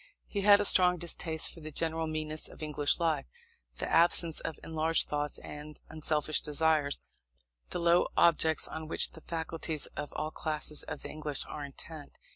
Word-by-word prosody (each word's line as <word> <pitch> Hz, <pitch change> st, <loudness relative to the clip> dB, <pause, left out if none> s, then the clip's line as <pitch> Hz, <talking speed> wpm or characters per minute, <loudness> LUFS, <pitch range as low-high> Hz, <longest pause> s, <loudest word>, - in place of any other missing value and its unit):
He 200 Hz, -, -3 dB
had 205 Hz, 0 st, +7 dB
a 205 Hz, -, +2 dB
strong 180 Hz, -2 st, +7 dB
distaste 165 Hz, -1 st, -1 dB
for -, -, -12 dB
the 155 Hz, -1 st, -8 dB
general 160 Hz, +1 st, -1 dB
meanness 155 Hz, 0 st, -4 dB
of -, -, -11 dB
English 150 Hz, 0 st, +1 dB
life, 160 Hz, -, 0 dB, 0.5 s
the -, -, -3 dB
absence 170 Hz, -1 st, +3 dB
of 160 Hz, -, -6 dB
enlarged 160 Hz, 0 st, +1 dB
thoughts 150 Hz, 0 st, -2 dB
and 150 Hz, +1 st, -10 dB
unselfish 155 Hz, -1 st, 0 dB
desires, 150 Hz, -1 st, +1 dB, 0.7 s
the -, -, -3 dB
low 170 Hz, +1 st, +3 dB
objects 160 Hz, -2 st, +3 dB
on 160 Hz, 0 st, -7 dB
which -, -, +1 dB
the 160 Hz, -, -12 dB
faculties 160 Hz, -2 st, -3 dB
of 145 Hz, -, -5 dB
all 155 Hz, 0 st, -3 dB
classes 155 Hz, -1 st, 0 dB
of -, -, -6 dB
the -, -, -7 dB
English 150 Hz, -2 st, 0 dB
are 150 Hz, -, -7 dB
intent. 145 Hz, +2 st, -10 dB
160 Hz, 170 wpm, -30 LUFS, 150-165 Hz, 0.7 s, had